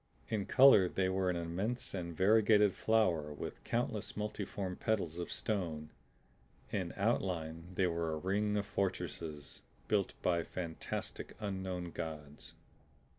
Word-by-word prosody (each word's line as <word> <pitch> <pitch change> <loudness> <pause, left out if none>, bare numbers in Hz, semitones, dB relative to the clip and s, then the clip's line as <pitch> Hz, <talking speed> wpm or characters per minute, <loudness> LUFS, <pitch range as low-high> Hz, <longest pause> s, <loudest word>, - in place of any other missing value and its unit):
In 105 -3 -1
color 130 -9 +7
they 95 0 +1
were 95 0 +1
an 90 - +1
immense 90 +8 -2
and 85 -4 -4
variegated 105 0 +5
flower 90 -9 +2
with 75 - -6
countless 110 -4 -2
multiform 100 -3 -3
petals 90 -7 -1
of 85 - -4
stone; 80 -8 -2 0.8
in - - -1
outline 85 -3 -1
they 95 - +3
were 85 -2 0
a - - -2
ring 105 +5 0
of 100 - 0
fortresses 85 -7 -3 0.3
built 105 -3 +1
by 85 -2 +3
fantastic 85 -1 -5
unknown 95 -4 -3
Gods. 75 -3 -6
95 Hz, 125 wpm, -35 LUFS, 85-105 Hz, 0.8 s, color